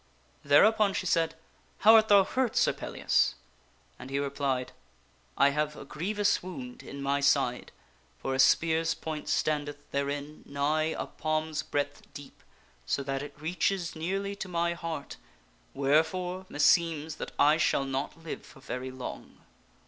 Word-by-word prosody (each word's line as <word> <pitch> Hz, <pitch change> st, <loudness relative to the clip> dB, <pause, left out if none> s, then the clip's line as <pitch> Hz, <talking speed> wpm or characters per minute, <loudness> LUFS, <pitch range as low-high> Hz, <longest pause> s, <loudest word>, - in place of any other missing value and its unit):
Thereupon 200 Hz, +8 st, +5 dB
she -, -, -2 dB
said, 165 Hz, -1 st, +1 dB, 0.2 s
" -, -, -35 dB
How 220 Hz, +2 st, +8 dB
art 220 Hz, -1 st, +7 dB
thou 200 Hz, -2 st, +7 dB
hurt, 250 Hz, +4 st, -1 dB
Sir -, -, +3 dB
Pellias?" -, -, 0 dB, 0.6 s
And 130 Hz, -, -9 dB
he 135 Hz, -, -2 dB
replied, 140 Hz, -2 st, -1 dB, 0.3 s
" -, -, -35 dB
I 140 Hz, +1 st, +6 dB
have 150 Hz, +1 st, -1 dB
a -, -, -9 dB
grievous 200 Hz, +8 st, 0 dB
wound 250 Hz, +7 st, -8 dB
in 140 Hz, 0 st, -8 dB
my 140 Hz, +1 st, +1 dB
side, 140 Hz, -3 st, +1 dB, 0.5 s
for 135 Hz, -, -3 dB
a 130 Hz, -, -2 dB
spear's 165 Hz, +4 st, +3 dB
point 155 Hz, -1 st, -5 dB
standeth 145 Hz, -1 st, 0 dB
therein 140 Hz, +2 st, -3 dB
nigh 150 Hz, +3 st, 0 dB
a -, -, -2 dB
palm's 155 Hz, 0 st, -2 dB
breadth 145 Hz, 0 st, -3 dB
deep 145 Hz, -1 st, -11 dB, 0.4 s
so 140 Hz, -, -1 dB
that 135 Hz, 0 st, -2 dB
it 145 Hz, 0 st, -9 dB
reaches 175 Hz, +2 st, -1 dB
nearly 195 Hz, +5 st, -2 dB
to 195 Hz, -, -5 dB
my 170 Hz, -1 st, 0 dB
heart, 165 Hz, -4 st, -6 dB, 0.6 s
wherefore, 165 Hz, +7 st, +1 dB
meseems 160 Hz, +1 st, +2 dB
that -, -, -6 dB
I 150 Hz, +2 st, +5 dB
shall 140 Hz, -3 st, +2 dB
not 135 Hz, +4 st, -4 dB
live 165 Hz, -, -6 dB
for 140 Hz, -, -16 dB
very 130 Hz, -1 st, -5 dB
long." 130 Hz, -1 st, -8 dB
155 Hz, 155 wpm, -29 LUFS, 140-175 Hz, 0.6 s, How